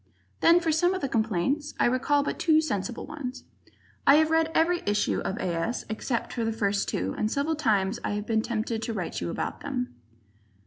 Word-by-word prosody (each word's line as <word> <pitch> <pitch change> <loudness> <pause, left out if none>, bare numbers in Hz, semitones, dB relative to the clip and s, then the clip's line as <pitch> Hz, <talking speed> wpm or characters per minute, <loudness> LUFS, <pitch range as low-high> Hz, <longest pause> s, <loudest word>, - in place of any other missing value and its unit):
Then 340 +1 +6
for 335 -2 0
some 350 +4 +2
of 375 - -4
the 275 - 0
complaints, 230 - 0
I - - +4
recall 270 +4 +2
but - - -3
two 315 -2 +4
sensible 240 -6 -2
ones. 275 -5 -6 0.6
I 275 - +9
have 315 +1 +4
read 325 0 +3
every 345 +2 +3
issue 205 0 +1
of 195 - -3
A. - - -4
S. 165 +9 -2
except 225 +2 -3
the 225 -2 0
first 200 -2 0
two, 95 +2 -2
and 215 - 0
several 285 +3 0
times 215 -6 +1
I - - -1
have 210 0 -3
been 220 -1 +1
tempted 225 0 -2
to 230 - -3
write 185 -5 -3
to - - -3
you - - -2
about - - -4
them. 125 0 -3
235 Hz, 210 wpm, -27 LUFS, 210-305 Hz, 0.6 s, I